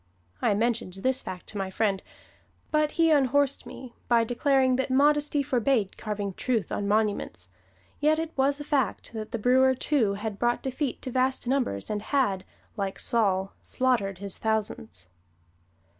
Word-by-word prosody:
I 205 - +2
mentioned 230 -3 0
this 255 +7 0
fact 180 -1 -7
to 205 - -5
my 190 -1 -2
friend, 195 -1 0 0.7
but 305 -1 +2
he 330 -1 +3
unhorsed 280 -1 +2
me 250 -2 -10
by 235 -1 +4
declaring 260 +2 +2
that 265 0 -1
modesty 290 +2 +3
forbade 250 -6 +1
carving 205 -2 -4
truth 230 +1 -1
on 200 - -2
monuments, 210 0 -1 0.5
yet 305 +1 +3
it 325 0 -3
was 280 +1 +2
a - - -5
fact 280 -5 -1
that 215 -1 -6
the - - -2
brewer, 260 +3 +4
too, 245 -7 +1
had 205 0 -5
brought 240 0 +1
defeat 265 0 -3
to 255 - -4
vast 260 +1 +1
numbers 245 - -1
and 210 -1 -2
had, 205 -8 0 0.3
like 195 -3 -3
Saul, 195 -5 +1
slaughtered 230 -7 0
his 200 0 -5
thousands. 205 - -2
240 Hz, 160 wpm, -27 LUFS, 205-270 Hz, 0.7 s, by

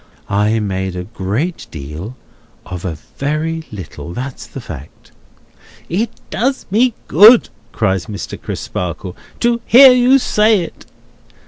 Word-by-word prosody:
I 105 +3 +1
made 95 -3 -3
a 90 - -4
great 110 - -3
deal 80 - -8 0.5
of 90 -1 -7
a 80 -4 -3 0.2
very 155 +3 -2
little; 90 -3 -8
that's 130 +5 -6
the - - -8
fact." 75 - -11 0.8
"It 210 +8 0 0.2
does 265 +3 -1
me 235 +3 +3
good," 215 +8 +7 0.2
cries 95 -2 0
Mr. 105 -2 -7
Crisparkle, 90 +1 -5 0.3
"to 235 0 +2
hear 260 +2 +9
you 250 +2 +5
say 215 -5 +3
it!" 165 - -9
125 Hz, 125 wpm, -17 LUFS, -, 0.8 s, hear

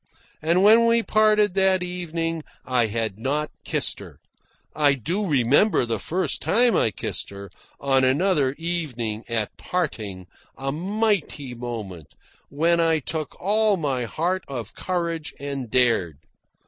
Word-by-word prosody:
And 170 +4 +2
when 225 +3 +6
we 230 0 +3
parted 215 -2 +3
that 190 -1 +3
evening 165 -2 -3 0.2
I 125 -3 +2
had 110 -2 -3
not 145 +5 -1
kissed - - 0
her. - - -12 0.6
I 145 -2 +4
do 180 - -2
remember 140 - +3
the 115 -2 -2
first 185 +3 0
time 240 +2 +3
I - - +3
kissed 105 - -4
her, 100 -1 -10 0.3
on 135 -1 +2
another 140 0 +2
evening, 130 -11 -3
at 110 -3 -2
parting 110 - -3 0.3
a 135 0 -2
mighty 185 - -1
moment, 110 -9 -7 0.3
when 165 +4 +2
I 165 -1 +3
took 155 0 -4
all 210 +1 +3
my 135 -6 -1
heart 175 +9 -1
of 120 -6 -6
courage 170 -3 -3
and 140 -3 -5
dared. 115 - +2
150 Hz, 135 wpm, -24 LUFS, 120-180 Hz, 0.6 s, when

